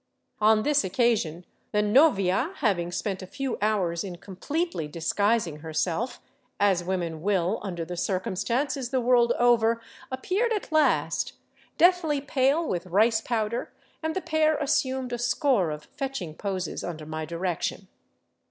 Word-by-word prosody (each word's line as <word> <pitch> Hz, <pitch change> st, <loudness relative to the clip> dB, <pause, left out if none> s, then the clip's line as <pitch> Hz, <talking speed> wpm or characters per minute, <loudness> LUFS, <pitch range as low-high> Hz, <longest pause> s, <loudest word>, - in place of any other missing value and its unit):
On 215 Hz, 0 st, +4 dB
this 295 Hz, -1 st, +3 dB
occasion 190 Hz, -5 st, 0 dB, 0.3 s
the 210 Hz, 0 st, +3 dB
novia, 235 Hz, -, +3 dB
having 180 Hz, -, 0 dB
spent 190 Hz, +2 st, -3 dB
a 185 Hz, -, -8 dB
few 270 Hz, +4 st, -4 dB
hours 190 Hz, -6 st, +1 dB
in 185 Hz, -3 st, -6 dB
completely 200 Hz, -, -3 dB
disguising 175 Hz, +2 st, 0 dB
herself, 165 Hz, -, -2 dB, 0.4 s
as 195 Hz, -4 st, +3 dB
women 170 Hz, -3 st, -3 dB
will 190 Hz, +1 st, +1 dB
under 175 Hz, -4 st, -4 dB
the 180 Hz, -, -6 dB
circumstances 235 Hz, +9 st, -1 dB
the 260 Hz, 0 st, +1 dB
world 240 Hz, -1 st, +4 dB
over, 230 Hz, -1 st, +3 dB, 0.3 s
ap 260 Hz, 0 st, -5 dB
peared 455 Hz, +5 st, +1 dB
at 415 Hz, -5 st, -4 dB
last, 255 Hz, -, +2 dB, 0.4 s
deathly 340 Hz, -4 st, +4 dB
pale 280 Hz, +3 st, +1 dB
with 175 Hz, 0 st, -2 dB
rice 220 Hz, +5 st, +3 dB
powder, 225 Hz, -1 st, -2 dB, 0.3 s
and 320 Hz, 0 st, -2 dB
the 375 Hz, -, -1 dB
pair 315 Hz, -1 st, +2 dB
assumed 260 Hz, -3 st, 0 dB
a 240 Hz, -, -2 dB
score 245 Hz, -, +2 dB
of 150 Hz, 0 st, -5 dB
fetching 265 Hz, -, -5 dB
poses 185 Hz, -1 st, -4 dB
under 160 Hz, -3 st, -5 dB
my 155 Hz, +1 st, -4 dB
direction. 170 Hz, +2 st, -3 dB
215 Hz, 145 wpm, -26 LUFS, 180-265 Hz, 0.4 s, On